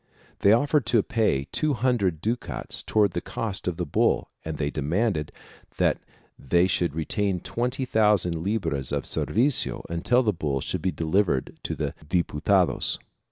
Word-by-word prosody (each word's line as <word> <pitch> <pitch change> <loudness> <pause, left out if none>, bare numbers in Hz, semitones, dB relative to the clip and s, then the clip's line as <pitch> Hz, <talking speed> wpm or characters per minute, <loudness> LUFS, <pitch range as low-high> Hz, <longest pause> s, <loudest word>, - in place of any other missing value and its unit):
They 100 - +5
offered 140 +3 +3
to 120 -4 +3
pay 110 - +1
two 155 -2 +1
hundred 110 -9 +1
ducats 115 +5 -2
towards 105 -4 +2
the 85 - -2
cost 105 -5 -4
of 90 -2 -1
the 90 - -2
bull 70 - +1
and 80 -1 -4
they 70 -1 -1
demanded 80 +2 -1 0.5
that - - +2 0.4
they 85 +7 +3
should 90 -4 0
retain 95 +3 0
twenty 125 +7 -2
thousand 105 -8 +2
libras 85 - -1
of 70 -1 -1
the - - -9
servicio 125 +5 0
until 120 +10 +2
the 105 -3 +1
bull 75 -5 -2
should - - -3
be 95 - 0
delivered 80 -2 0
to - - -3
the 75 0 -3
Diputaclos. 85 +1 +1
95 Hz, 160 wpm, -26 LUFS, 80-115 Hz, 0.5 s, They